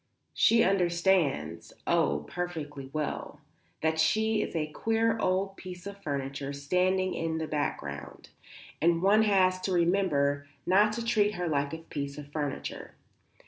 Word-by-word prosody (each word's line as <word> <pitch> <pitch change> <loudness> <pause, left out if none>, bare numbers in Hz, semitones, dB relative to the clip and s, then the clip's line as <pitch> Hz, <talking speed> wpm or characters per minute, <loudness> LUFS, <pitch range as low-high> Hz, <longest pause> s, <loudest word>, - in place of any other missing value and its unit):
She 230 0 +5
understands 175 -4 +1
oh, 75 +1 +1
perfectly 150 -6 -5
well 155 0 -4 0.4
that 160 0 +1
she 220 +7 +2
is - - -4
a 155 -1 -1
queer 225 +5 +1
old 195 0 0
piece 180 -1 -9
of 200 0 -8
furniture 140 -2 -3
standing 185 +6 +1
in 165 -1 -2
the 160 - -2
background, 70 - -4 0.5
and 170 +1 +3
one 205 +3 +5
has 185 -3 +3
to 190 - -2
remember 165 -6 +2 0.2
not 205 +4 +4
to 235 +1 -4
treat 210 -3 +2
her 175 -1 -2
like 140 -2 0
a 160 - -4
piece 140 -2 -4
of 145 -1 -9
furniture. 145 -2 -4
175 Hz, 140 wpm, -29 LUFS, 145-195 Hz, 0.5 s, She